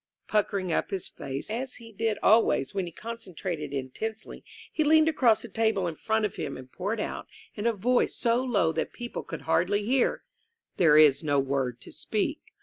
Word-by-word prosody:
Puckering 200 -4 0
up - - 0
his 190 -2 -3
face, 135 +8 -6
as 255 +3 -3
he 230 -1 -12
did 220 0 -1
always 220 -1 +4
when 190 -3 -2
he - - -7
con 230 +7 -7
centrated 170 -7 -5
intensely, 145 +12 -5 0.3
he 310 - +2
leaned 315 +1 +5
across 250 -8 +3
the - - -6
table 220 -2 +1
in 170 - -2
front 220 +6 0
of 205 - -4
him 140 - -4
and 130 0 -12
poured 205 +5 -3
out, - - -4 0.3
in 210 +2 -2
a 235 - +3
voice 245 +5 +1
so 235 +1 +1
low 205 -10 +2
that 160 - -3
people 240 0 -5
could - - -7
hardly 190 +6 +1
hear: 255 +2 +1 0.5
"There 155 -4 +6
is 150 -1 +6
no 145 -2 +2
word 135 -3 -1
to - - -11
speak. - - -2
205 Hz, 195 wpm, -28 LUFS, 160-230 Hz, 0.5 s, There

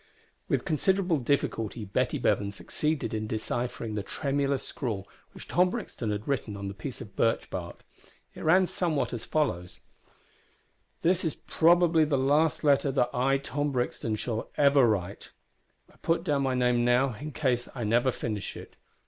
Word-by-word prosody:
With - - 0
considerable 180 0 +1
difficulty 115 -4 -1
Betty 95 - 0
Bevan 100 0 +1
succeeded 150 +3 -1
in 110 0 -2
deciphering 115 +1 -3
the 105 - -1
tremulous 140 +4 -1
scrawl 110 - -4 0.2
which - - -12
Tom 180 +1 +3
Brixton 180 - -4
had 105 0 -3
written 120 -7 -2
on 100 0 -5
the 100 - -4
piece 130 +6 -7
of 105 -5 -10
birch 115 0 +1
bark. 85 -2 -6 0.5
It - - -10
ran 185 +4 +5
somewhat 165 -7 -1
as 115 - -4
follows: 90 - -1 1.2
"This 180 +2 +3
is 160 -4 -1
probably 170 -1 +4
the 150 -2 +1
last 145 +5 +2
letter 140 -1 +3
that 125 -2 +1
I, 135 +2 +2
Tom 145 +1 -2
Brixton, 120 -3 -1
shall 110 +1 -3
ever 140 -3 +5
write. 100 -5 -2 0.6
(I - - -23
put 165 - 0
down 145 -2 +1
my 130 -1 +1
name 125 -1 +2
now, 125 +2 +3
in 150 +8 -7
case 125 -5 0
I 120 - -3
never 120 +4 +3
finish 105 -4 -4
it.) - - -12
130 Hz, 165 wpm, -28 LUFS, 110-150 Hz, 1.2 s, ran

